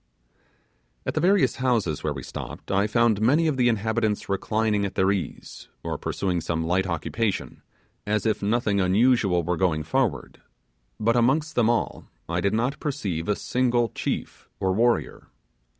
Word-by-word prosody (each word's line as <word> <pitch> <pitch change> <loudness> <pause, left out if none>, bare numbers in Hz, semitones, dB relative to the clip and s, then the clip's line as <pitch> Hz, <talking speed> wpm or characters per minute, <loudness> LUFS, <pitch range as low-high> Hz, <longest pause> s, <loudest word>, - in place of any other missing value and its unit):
At - - -2
the - - 0
various 180 -8 +3
houses 115 - 0
where 75 - 0
we 65 -3 -6
stopped, - - -7
I 100 +1 +2
found 110 -1 +2
many 145 +9 +3
of 155 -3 +1
the 125 -2 +3
inhabitants 110 -1 0
reclining 105 +1 0
at 100 - -3
their 95 +1 +3
ease, 100 -3 -5 0.2
or - - -3
pursuing 90 -3 -2
some 80 0 -2
light 95 +3 +1
occupation, 95 +5 -2 0.5
as 105 0 0
if 110 - +1
nothing 105 -1 +1
unusual 100 -2 +3
were 85 +1 -1
going 80 -4 +1
forward; 130 - -1 0.6
but 115 +2 +2
amongst 135 +7 +2
them 115 -2 +3
all 120 - -1 0.2
I 85 +1 -1
did 100 +3 +1
not 125 +6 -1
perceive 100 - -3
a 105 - +3
single 120 -1 +1
chief - - -4
or 95 -1 +1
warrior. 115 +4 0
105 Hz, 160 wpm, -25 LUFS, 95-120 Hz, 0.6 s, various